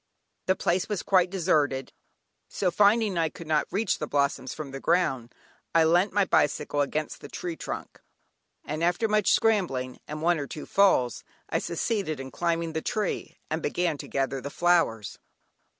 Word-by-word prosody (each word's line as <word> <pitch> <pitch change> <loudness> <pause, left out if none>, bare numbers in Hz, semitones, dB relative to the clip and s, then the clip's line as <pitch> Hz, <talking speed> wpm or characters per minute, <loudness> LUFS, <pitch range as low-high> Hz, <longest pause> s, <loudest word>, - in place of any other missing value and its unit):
The 185 - +3
place 185 +4 0
was 205 -3 -2
quite 185 -2 +3
deserted, 150 -8 0 0.6
so 185 -3 0
finding 205 0 +3
I 165 -1 +2
could 165 - -11
not 155 -1 +1
reach 205 +5 0
the 150 - -3
blossoms 140 -3 0
from 150 -3 -7
the 135 - -6
ground, 145 -8 0 0.4
I 165 - +6
leant 175 +5 +3
my 205 0 +2
bicycle 145 -3 +1
against 150 +2 -2
the - - -9
tree 175 -2 -5
trunk, - - -7 0.6
and 155 +2 -3
after 175 +6 +2
much 210 -1 +2
scrambling, 150 - +1
and 150 +1 -6
one 170 -1 +3
or 140 - -4
two 150 - -7
falls, 185 -12 +3 0.3
I - - +2
succeeded 170 - -2
in 135 0 -7
climbing 170 -1 -1
the 160 - -2
tree, 210 +2 -3
and 160 +1 -1
began 165 -1 -1
to - - -7
gather 135 -1 -1
the 140 - -5
flowers. 165 - +1
165 Hz, 170 wpm, -27 LUFS, 145-185 Hz, 0.6 s, I